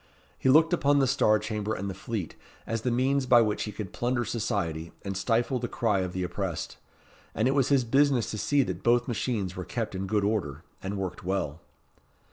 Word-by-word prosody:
He 130 - 0
looked 160 +5 +6
upon 145 -4 +3
the 135 - +4
Star 125 -5 +3
Chamber 105 0 -3
and 100 - -4
the 95 - -3
Fleet 100 -1 -4 0.3
as 115 -1 -2
the 125 - 0
means 130 +2 +1
by 120 -2 +7
which 105 -2 0
he 105 - -5
could 105 -2 -7
plunder 120 0 0
society 85 -7 -2
and 100 -1 -4
stifle 120 +5 +1
the 120 - -2
cry 110 -4 0
of 90 -1 -2
the 95 - -2
oppressed; 90 -2 -4 0.6
and 110 - +2
it 135 - +2
was 135 -3 +2
his 140 -3 +4
business 135 0 +2
to 110 - -4
see 135 +7 +2
that - - -4
both 120 0 +3
machines 110 -5 -2
were 90 - -4
kept 115 +3 -4
in 95 0 -3
good 105 0 +1
order, 85 -8 -1 0.2
and 100 +1 -4
worked 95 -2 -4
well. 85 -4 -2
110 Hz, 210 wpm, -28 LUFS, 95-125 Hz, 0.6 s, by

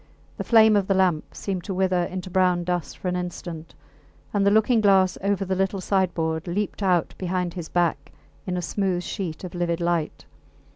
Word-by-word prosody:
The - - -3
flame 220 -2 +6
of 200 -2 +2
the 195 - +2
lamp 180 -5 +1
seemed 190 -3 -4
to 195 - -3
wither 185 -1 +1
into 185 0 -6
brown 180 -1 +2
dust 175 -1 -3
for - - -5
an 180 - 0
instant, 175 -2 -6 0.6
and 205 -1 +2
the 200 - +5
looking 220 +2 +3
glass 190 -3 +4
over 200 0 0
the 190 - -1
little 195 +1 0
sideboard 170 -4 0
leaped 200 +4 -2
out 180 -4 +1
behind 180 -1 -2
his 175 -3 -6
back 165 -5 0 0.4
in 180 -1 -1
a 180 - -3
smooth 185 -3 -1
sheet 175 -6 -5
of 180 - -7
livid 175 -1 -1
light. 170 -2 -1
185 Hz, 190 wpm, -24 LUFS, 175-195 Hz, 0.6 s, flame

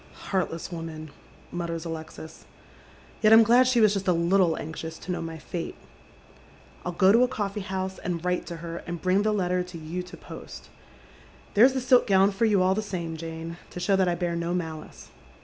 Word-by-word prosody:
" - - -23 0.2
Heartless 180 -2 -1
woman! 160 -2 -7 0.2
" - - -25
mutters 170 -1 -4
Alexis. 160 -1 -8 0.4
" - - -25
Yet 215 -1 +5
I'm 225 +1 +9
glad 245 +3 +5
she 255 -2 +3
was 215 -2 +5
just 195 -2 -3
a 180 - +5
little 170 0 +3
anxious 160 +1 -6
to 185 - -6
know 180 - -2
my 165 -1 -5
fate. 165 +2 -5 1.1
I'll 180 - -2
go 190 +2 +4
to 230 +3 +5
a 250 - +5
coffee 210 -4 -3
liouHe, 190 -1 -4
and 175 -1 -3
write 180 0 -1
to 170 - -5
her, 170 0 -5
and 175 -1 -4
bring 185 +3 +2
the 215 +1 +1
letter 180 -3 +1
to 180 -1 -7
you 165 +3 -5
to 180 +1 -11
post. - - -10 0.8
There's 245 +6 +6
the 260 - -1
silk 250 0 +4
gown 195 0 +5
for 205 +4 +1
you 205 -4 +3
all 185 +1 +3
the 215 - -1
same, 175 -6 -4
Jane, 165 +1 -6
to - - -7
show 185 +2 +2
that 190 -1 +2
I 175 - +1
bear 170 -1 -2
no 170 +1 -1
malice." 160 -3 -6
180 Hz, 215 wpm, -26 LUFS, 165-200 Hz, 1.1 s, I'm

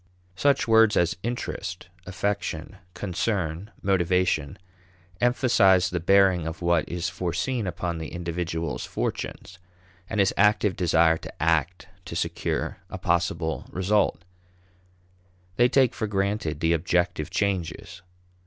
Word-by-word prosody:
Such 140 +6 +2
words 110 -1 +5
as 85 -1 +2
interest, 100 -6 -4 0.2
affection, 100 -2 -3 0.2
concern, 95 -1 -2
motivation, 90 -5 +1 0.6
emphasize 115 -7 +4
the 90 - -1
bearing 95 -1 +4
of 80 +2 -6
what 85 -2 +2
is 90 +1 -2
foreseen 95 +6 -2
upon 85 -1 -3
the 80 - -5
individual's 85 -2 -3
fortunes, 90 0 -4 0.5
and 110 - -2
his 100 -1 +3
active 105 -1 +3
desire 80 -2 +3
to - - -9
act 85 +4 0 0.2
to - - -7
secure - - -2
a - - -6
possible 85 -1 -1
result. 95 -2 +1 1.3
They 120 +1 +5
take 130 -1 +3
for 110 - -3
granted 100 -6 -1
the 80 +1 +3
objective 85 -1 0
changes. 95 -3 -2
90 Hz, 115 wpm, -25 LUFS, 85-100 Hz, 1.3 s, words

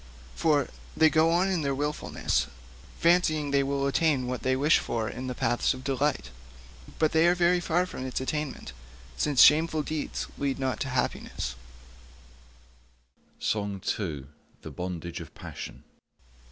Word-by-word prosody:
For 145 - +2 0.3
they 160 -1 +6
go 160 +1 +4
on 175 +3 +3
in 180 -4 0
their 140 -2 0
wilfulness 145 +2 -1 0.5
fancying 160 -4 +3
they 140 0 +3
will 140 0 -1
attain 140 -2 +2
what 125 0 -3
they 130 0 +1
wish 145 +4 +4
for 115 -2 -2
in 130 +3 -5
the 125 - -4
paths 120 +3 +1
of 130 - -10
delight; 135 - -1 0.7
but 155 -1 +2
they 160 +1 +4
are 175 - +4
very 175 0 +3
far 175 +1 +1
from 130 -7 -6
its 130 - -2
attainment, 135 - -4 0.4
since 140 - +4
shameful 155 +1 +5
deeds 155 0 -3
lead 140 -1 -1
not 130 -3 -2
to - - -2
happiness.' 60 - -2
145 Hz, 125 wpm, -28 LUFS, 130-160 Hz, 0.7 s, they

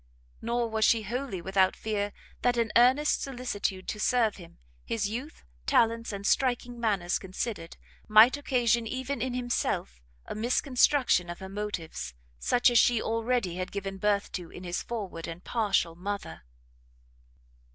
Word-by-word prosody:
Nor 235 +1 0
was 220 -1 -1
she 225 0 +4
wholly 235 -4 -4
without 190 0 +2
fear 205 -2 -2 0.3
that 245 -1 +2
an 230 -2 +1
earnest 260 +5 +4
solicitude 245 -8 -3
to 210 - -4
serve 230 -1 +2
him, 170 -3 -13 0.3
his 220 -3 -1
youth, 250 +9 -6 0.2
talents, 230 0 +2
and 200 -1 -6
striking 245 -1 +1
manners 200 -6 0
considered, 190 -2 -5 0.3
might 215 +5 +7
occasion 240 -5 +1
even 260 +1 -3
in 250 0 -2
himself 240 - -2 0.2
a - - -5
misconstruction 245 - +2
of 175 - -5
her 190 0 -8
motives, 190 - -5 0.2
such 245 - +3
as 240 - +6
she 240 -2 +4
already 230 -5 -1
had 185 0 -4
given 195 -1 -5
birth 205 0 +1
to 175 -3 -5
in 180 - -10
his 175 0 -3
forward 200 -8 -5
and 165 +1 -8
partial 205 -7 +1
mother. 180 - -6
220 Hz, 150 wpm, -28 LUFS, 190-245 Hz, 0.3 s, might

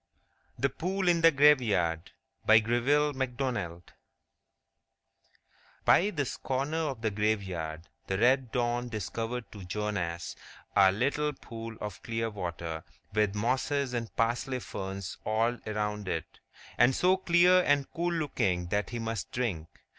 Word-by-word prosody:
The 140 - +1
Pool 185 +6 -2
in 170 -1 +4
the 165 - +8
Graveyard 115 - +3 0.4
By 110 - +8
GREVILLE 125 +7 +2
MACDONALD 120 -10 -3 1.9
BY 200 - +5
this 145 -9 -3
corner 145 +5 -1
of 125 -4 -7
the 110 - +1
graveyard 95 -6 -2 0.2
the 95 - -1
red 125 +2 +3
dawn 120 0 0
discovered 115 +3 -4
to 100 -3 -9
Jonas 90 -3 -3 0.4
a 95 -1 +7
little 145 +8 0
pool 115 -3 -8
of 105 -3 -6
clear 115 0 -2
water, 85 -4 -5 0.3
with 105 -1 +2
mosses 130 +4 0
and 115 -2 -2
parsley 120 +3 0
ferns 95 -4 -6
all 115 +3 +1
around 105 -1 -2
it, 80 -3 -4 0.4
and 120 +2 +5
so 185 +1 +4
clear 180 0 +5
and 145 -4 +2
cool 175 +1 -1
looking 110 - 0
that 105 +1 0
he 120 - -4
must 115 -5 -4
drink. 100 -11 -2
115 Hz, 130 wpm, -30 LUFS, 100-135 Hz, 1.9 s, the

